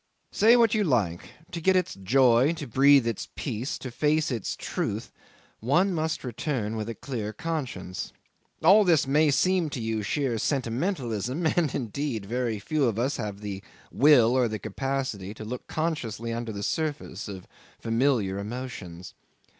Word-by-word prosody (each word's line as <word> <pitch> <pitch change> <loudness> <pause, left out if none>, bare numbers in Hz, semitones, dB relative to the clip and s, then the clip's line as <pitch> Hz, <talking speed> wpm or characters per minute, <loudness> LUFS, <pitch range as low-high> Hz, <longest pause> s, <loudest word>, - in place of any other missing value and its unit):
Say 225 +3 +5
what 230 -2 +4
you 215 -2 +2
like, 105 - 0 0.2
to 170 - -5
get 190 +3 +3
its 185 -2 +1
joy, 125 - +3
to 160 -3 -6
breathe 135 +1 +5
its 115 -3 -3
peace, 125 -1 -3
to 130 - -7
face 150 +4 +1
its 115 -5 -3
truth, - - -3 0.5
one 175 - +2
must 160 -1 -2
return 120 -3 -3
with 110 0 -4
a 115 - -4
clear 110 -3 -4
conscience. 120 - -4 0.5
All 200 +6 +7
this 165 -7 +3
may 150 +3 +3
seem 180 +3 +2
to 140 - -5
you 110 -1 -2
sheer 125 +1 -1
sentimentalism; 130 - -1
and 160 -3 +1
indeed 120 -2 -3
very 120 0 -1
few 145 +8 0
of 115 -4 0
us 130 +5 0
have 105 -3 -5
the 100 -2 -5 0.3
will 130 -5 +6
or 130 -2 +3
the 110 -1 -3
capacity 110 -2 -3
to 110 - -8
look 125 +3 -6
consciously 120 -9 -2
under 115 -1 -4
the 100 -1 -5
surface 150 - -3
of 95 -3 -8 0.3
familiar 115 -5 +1
emotions. 100 -6 -7
125 Hz, 160 wpm, -27 LUFS, 110-150 Hz, 0.5 s, All